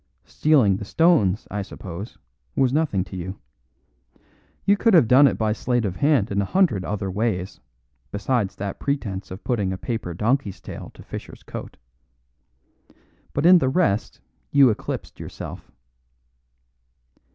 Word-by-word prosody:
Stealing 130 Hz, -11 st, +3 dB
the 105 Hz, -, -6 dB
stones, 110 Hz, -, +2 dB
I 105 Hz, -, -2 dB
suppose, 95 Hz, +2 st, -8 dB, 0.4 s
was 130 Hz, -2 st, +2 dB
nothing 145 Hz, -, +1 dB
to 95 Hz, 0 st, -10 dB
you. 95 Hz, +2 st, -5 dB, 1.3 s
You 200 Hz, -, +5 dB
could 220 Hz, 0 st, +3 dB
have 155 Hz, -9 st, +6 dB
done 135 Hz, +4 st, +7 dB
it -, -, 0 dB
by 110 Hz, -1 st, +1 dB
sleight 120 Hz, +1 st, 0 dB
of 90 Hz, -3 st, -3 dB
hand 140 Hz, -9 st, +2 dB
in 100 Hz, 0 st, +1 dB
a -, -, -1 dB
hundred 160 Hz, -, +2 dB
other 100 Hz, 0 st, -3 dB
ways 100 Hz, -2 st, -2 dB, 0.5 s
besides 105 Hz, -1 st, -1 dB
that 100 Hz, 0 st, -5 dB
pretence 105 Hz, -9 st, -3 dB
of 95 Hz, +3 st, -9 dB
putting 105 Hz, -7 st, 0 dB
a 95 Hz, -, -3 dB
paper 100 Hz, -4 st, -4 dB
donkey's 110 Hz, 0 st, 0 dB
tail -, -, -8 dB
to -, -, -13 dB
Fischer's -, -, -9 dB
coat. -, -, -8 dB, 1.6 s
But 145 Hz, -, 0 dB
in 180 Hz, 0 st, +8 dB
the 130 Hz, -, +1 dB
rest 130 Hz, -, 0 dB, 0.3 s
you 140 Hz, -4 st, +6 dB
eclipsed 105 Hz, -, -5 dB
yourself." -, -, -8 dB
110 Hz, 145 wpm, -23 LUFS, 95-140 Hz, 1.6 s, in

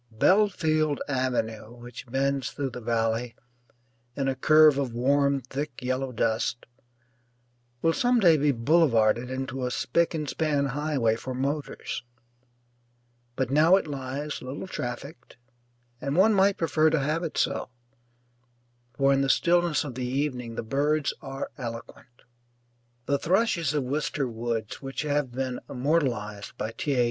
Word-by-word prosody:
Belfield 155 Hz, -, +2 dB
Avenue, 120 Hz, -4 st, -2 dB
which 120 Hz, +1 st, -10 dB
bends 135 Hz, -1 st, 0 dB
through 135 Hz, +3 st, -4 dB
the 125 Hz, -, -7 dB
valley 115 Hz, +1 st, -1 dB, 0.8 s
in 135 Hz, -1 st, -1 dB
a 135 Hz, -, +1 dB
curve 155 Hz, +1 st, +6 dB
of 130 Hz, -4 st, -2 dB
warm 140 Hz, +2 st, +2 dB
thick 135 Hz, +2 st, -5 dB
yellow 130 Hz, +1 st, -2 dB
dust, 115 Hz, +1 st, -1 dB, 1.2 s
will 165 Hz, -, +4 dB
some 245 Hz, +6 st, +2 dB
day 175 Hz, -6 st, +6 dB
be 145 Hz, -1 st, +2 dB
boulevarded 120 Hz, -3 st, +3 dB
into 130 Hz, 0 st, -4 dB
a 125 Hz, -, 0 dB
spick 165 Hz, +8 st, 0 dB
and 155 Hz, -2 st, -3 dB
span 150 Hz, -3 st, 0 dB
highway 145 Hz, -6 st, +1 dB
for 130 Hz, +2 st, -6 dB
motors. 140 Hz, +3 st, -3 dB, 1.3 s
But 130 Hz, -1 st, -1 dB
now 160 Hz, +5 st, +6 dB
it 195 Hz, -, +1 dB
lies 140 Hz, +1 st, -5 dB
little 130 Hz, +7 st, -6 dB
trafficked, 130 Hz, -4 st, -7 dB, 0.6 s
and 140 Hz, +2 st, -2 dB
one 205 Hz, +5 st, +5 dB
might 195 Hz, 0 st, +3 dB
prefer 160 Hz, -1 st, +3 dB
to 160 Hz, 0 st, +1 dB
have 155 Hz, +4 st, 0 dB
it 165 Hz, -, -4 dB
so, -, -, 0 dB, 1.3 s
for 140 Hz, 0 st, +4 dB
in 135 Hz, -, +2 dB
the 135 Hz, -, +1 dB
stillness 175 Hz, +1 st, +3 dB
of 140 Hz, -4 st, -6 dB
the 125 Hz, 0 st, -3 dB
evening 125 Hz, -3 st, -2 dB
the -, -, -3 dB
birds 145 Hz, +5 st, 0 dB
are 135 Hz, -1 st, -6 dB
eloquent. 120 Hz, 0 st, -8 dB, 0.8 s
The 140 Hz, -1 st, +1 dB
thrushes 170 Hz, -4 st, +1 dB
of 145 Hz, -, +1 dB
Wister 140 Hz, +1 st, -1 dB
Woods, 115 Hz, -2 st, -4 dB
which 135 Hz, +1 st, -4 dB
have 145 Hz, -3 st, 0 dB
been 130 Hz, 0 st, -3 dB
immortalized 125 Hz, -8 st, -1 dB
by 110 Hz, -, -3 dB
T. 140 Hz, +4 st, -2 dB
A. -, -, +1 dB
135 Hz, 145 wpm, -27 LUFS, 125-150 Hz, 1.3 s, curve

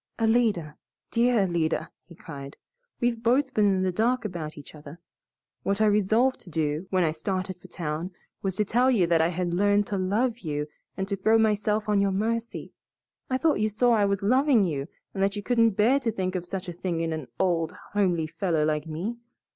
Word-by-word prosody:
"Alida, 220 Hz, -9 st, +1 dB, 0.3 s
dear 235 Hz, -2 st, +3 dB
Alida!" 170 Hz, -3 st, -1 dB
he 170 Hz, -, -15 dB
cried, 140 Hz, -4 st, -9 dB, 0.4 s
"we've 240 Hz, -1 st, 0 dB
both 260 Hz, +4 st, +2 dB
been 210 Hz, -1 st, +3 dB
in 190 Hz, -1 st, +2 dB
the 185 Hz, -, +1 dB
dark 230 Hz, +5 st, +1 dB
about 165 Hz, -6 st, -5 dB
each 145 Hz, -, -11 dB
other. 150 Hz, +2 st, -11 dB, 0.6 s
What 200 Hz, +1 st, -1 dB
I 220 Hz, -, +4 dB
resolved 215 Hz, +5 st, +2 dB
to -, -, -13 dB
do, 155 Hz, +2 st, -1 dB
when 185 Hz, -1 st, +2 dB
I 160 Hz, -, +2 dB
started 185 Hz, +2 st, -4 dB
for -, -, -13 dB
town, 160 Hz, +1 st, -4 dB, 0.3 s
was 190 Hz, -2 st, -2 dB
to 210 Hz, -, +1 dB
tell 245 Hz, +5 st, +3 dB
you 220 Hz, -9 st, +3 dB
that 165 Hz, -1 st, +3 dB
I 160 Hz, -, +3 dB
had 175 Hz, 0 st, -2 dB
learned 205 Hz, +2 st, +3 dB
to 200 Hz, -1 st, -3 dB
love 220 Hz, +6 st, 0 dB
you 150 Hz, -6 st, -3 dB, 0.3 s
and 190 Hz, 0 st, -2 dB
to 200 Hz, -, -1 dB
throw 220 Hz, +4 st, +3 dB
myself 215 Hz, -1 st, +1 dB
on 205 Hz, -1 st, +3 dB
your 200 Hz, -, +2 dB
mercy. 230 Hz, +3 st, -2 dB, 0.6 s
I 260 Hz, -, +1 dB
thought 310 Hz, -4 st, +2 dB
you 215 Hz, +1 st, +1 dB
saw 240 Hz, +4 st, +2 dB
I 210 Hz, -3 st, +3 dB
was 200 Hz, -1 st, -1 dB
loving 255 Hz, 0 st, +4 dB
you 145 Hz, -4 st, -3 dB, 0.3 s
and 195 Hz, -, -3 dB
that 195 Hz, +1 st, +1 dB
you 205 Hz, -, -5 dB
couldn't 230 Hz, -3 st, +3 dB
bear 245 Hz, +7 st, +4 dB
to 240 Hz, -4 st, -1 dB
think 185 Hz, -4 st, -2 dB
of 180 Hz, -2 st, -4 dB
such 190 Hz, 0 st, -5 dB
a 175 Hz, -, -5 dB
thing 170 Hz, -1 st, -3 dB
in 165 Hz, -1 st, -1 dB
an 155 Hz, -5 st, -5 dB
old, 170 Hz, -3 st, +1 dB, 0.2 s
homely 180 Hz, -6 st, +1 dB
fellow 160 Hz, -1 st, 0 dB
like 150 Hz, 0 st, -1 dB
me. 185 Hz, +10 st, -4 dB
195 Hz, 210 wpm, -26 LUFS, 170-225 Hz, 0.6 s, I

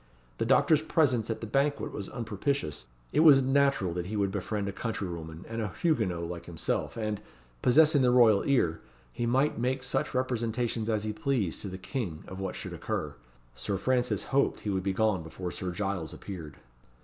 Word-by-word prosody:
The 115 Hz, -, 0 dB
doctor's 155 Hz, +4 st, +5 dB
presence 130 Hz, -8 st, +2 dB
at 115 Hz, -, -3 dB
the -, -, -3 dB
banquet 140 Hz, +6 st, 0 dB
was 100 Hz, -, -5 dB
unpropitious; 110 Hz, -, -3 dB, 0.3 s
it 145 Hz, -, +3 dB
was 145 Hz, -4 st, +8 dB
natural 135 Hz, -9 st, +2 dB
he 90 Hz, +4 st, -3 dB
should 100 Hz, -2 st, +1 dB
befriend 105 Hz, 0 st, -2 dB
a -, -, -1 dB
countrywoman 85 Hz, -6 st, -5 dB
and 115 Hz, 0 st, -3 dB
a 105 Hz, -3 st, -3 dB
Huguenot 95 Hz, -, +1 dB
like 85 Hz, 0 st, -6 dB
himself, 85 Hz, +5 st, -2 dB
and, 105 Hz, -2 st, -2 dB, 0.4 s
possessing 150 Hz, +3 st, +5 dB
the 125 Hz, -, +4 dB
royal 115 Hz, -5 st, +6 dB
ear, 85 Hz, -, +2 dB, 0.3 s
he 120 Hz, -, -2 dB
might 135 Hz, +2 st, +2 dB
make 130 Hz, +2 st, 0 dB
such 135 Hz, -1 st, -1 dB
representations 120 Hz, -2 st, -1 dB
as 110 Hz, -2 st, +1 dB
he 110 Hz, 0 st, -2 dB
pleased 110 Hz, -5 st, -1 dB
to -, -, -4 dB
the 95 Hz, -1 st, -6 dB
King 95 Hz, -, -4 dB
of 95 Hz, -, -8 dB
what 95 Hz, -1 st, -3 dB
should -, -, -6 dB
occur. -, -, -3 dB, 0.4 s
Sir -, -, -3 dB
Francis 125 Hz, +5 st, +1 dB
hoped 140 Hz, +1 st, +2 dB
he 105 Hz, -, -2 dB
would 95 Hz, -1 st, 0 dB
be 95 Hz, +1 st, 0 dB
gone 105 Hz, -2 st, +1 dB
before 85 Hz, +2 st, -6 dB
Sir 95 Hz, -, -4 dB
Giles 95 Hz, -3 st, -3 dB
appeared. 80 Hz, -7 st, -8 dB
110 Hz, 185 wpm, -29 LUFS, 95-130 Hz, 0.4 s, was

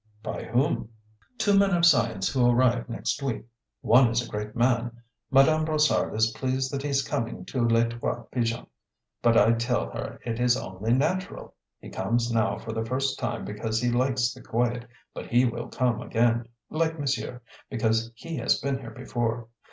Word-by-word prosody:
"By -, -, -5 dB
whom?" 120 Hz, -1 st, 0 dB, 0.5 s
"Two 205 Hz, -1 st, +3 dB
men 195 Hz, -2 st, +4 dB
of 170 Hz, 0 st, +4 dB
science 115 Hz, -, +3 dB
who 125 Hz, -2 st, +3 dB
arrive 120 Hz, -1 st, +2 dB
next 120 Hz, -, -2 dB
week. 130 Hz, -5 st, -3 dB, 0.4 s
One 120 Hz, +1 st, +6 dB
is 115 Hz, +1 st, 0 dB
a -, -, -11 dB
great 105 Hz, 0 st, -5 dB
man. 120 Hz, -1 st, 0 dB, 0.3 s
Madame 155 Hz, +4 st, +5 dB
Brossard 155 Hz, -6 st, +1 dB
is 110 Hz, +1 st, +2 dB
pleased 130 Hz, +2 st, -2 dB
that 140 Hz, -, -2 dB
he 145 Hz, -, -3 dB
is 140 Hz, 0 st, +1 dB
coming 115 Hz, 0 st, -3 dB
to 125 Hz, -3 st, -2 dB
Les 115 Hz, 0 st, +3 dB
Trois 120 Hz, 0 st, -3 dB
Pigeons, 115 Hz, -2 st, -1 dB, 0.6 s
but 115 Hz, -1 st, +4 dB
I 110 Hz, +1 st, +6 dB
tell 115 Hz, -, 0 dB
her -, -, -6 dB
it 115 Hz, -1 st, -3 dB
is 125 Hz, 0 st, +3 dB
only 95 Hz, +3 st, -4 dB
natural. 185 Hz, +8 st, -2 dB, 0.3 s
He -, -, -11 dB
comes 120 Hz, 0 st, 0 dB
now 110 Hz, -1 st, +1 dB
for 115 Hz, -, -7 dB
the 110 Hz, 0 st, -2 dB
first 130 Hz, +4 st, -1 dB
time 120 Hz, -1 st, -3 dB
because 110 Hz, +2 st, -2 dB
he 120 Hz, 0 st, +1 dB
likes 125 Hz, 0 st, +1 dB
the 130 Hz, -, -13 dB
quiet, 120 Hz, +1 st, -1 dB, 0.3 s
but -, -, -7 dB
he 120 Hz, +2 st, +3 dB
will 120 Hz, -1 st, -3 dB
come 125 Hz, -3 st, 0 dB
again, 115 Hz, 0 st, +1 dB, 0.2 s
like 160 Hz, 0 st, 0 dB
monsieur, 135 Hz, -3 st, -2 dB, 0.3 s
because 115 Hz, -1 st, 0 dB
he 165 Hz, +6 st, -6 dB
has 120 Hz, -, +2 dB
been 135 Hz, -1 st, -2 dB
here 120 Hz, -4 st, -8 dB
before. 120 Hz, -1 st, -3 dB
120 Hz, 185 wpm, -26 LUFS, 115-135 Hz, 0.6 s, One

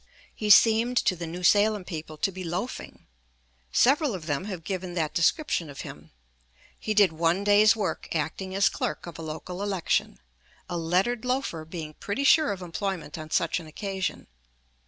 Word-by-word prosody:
He 215 Hz, -, -3 dB
seemed 230 Hz, +4 st, +6 dB
to 185 Hz, -, +2 dB
the 170 Hz, -1 st, -6 dB
New 175 Hz, +2 st, -7 dB
Salem 205 Hz, +1 st, +4 dB
people 155 Hz, -3 st, -7 dB
to 195 Hz, -, 0 dB
be 185 Hz, 0 st, -7 dB
"loafing"; 180 Hz, +8 st, -5 dB, 0.7 s
several 275 Hz, -, +3 dB
of 170 Hz, -4 st, -8 dB
them 145 Hz, +3 st, -2 dB
have 185 Hz, -5 st, -6 dB
given 185 Hz, -1 st, -4 dB
that 160 Hz, -3 st, -1 dB
description 170 Hz, -, +1 dB
of 140 Hz, -, -8 dB
him. 75 Hz, +1 st, -10 dB, 0.7 s
He 215 Hz, -, -2 dB
did 200 Hz, -5 st, +5 dB
one 165 Hz, +4 st, +1 dB
day's 205 Hz, +2 st, +5 dB
work 195 Hz, -7 st, -3 dB
acting 185 Hz, +5 st, -3 dB
as 195 Hz, -, +4 dB
clerk -, -, -3 dB
of 170 Hz, -2 st, -9 dB
a -, -, -5 dB
local 160 Hz, +4 st, -6 dB
election, 195 Hz, -4 st, -1 dB, 0.5 s
a 175 Hz, -, -4 dB
lettered 185 Hz, +8 st, 0 dB
loafer 250 Hz, -11 st, -2 dB
being 160 Hz, -2 st, -7 dB
pretty 200 Hz, -, -3 dB
sure 295 Hz, +1 st, +5 dB
of 190 Hz, -2 st, -5 dB
employment 180 Hz, -2 st, -4 dB
on 155 Hz, 0 st, -8 dB
such 165 Hz, +2 st, +1 dB
an 165 Hz, -, -11 dB
occasion. 190 Hz, +4 st, -4 dB
185 Hz, 175 wpm, -27 LUFS, 165-210 Hz, 0.7 s, seemed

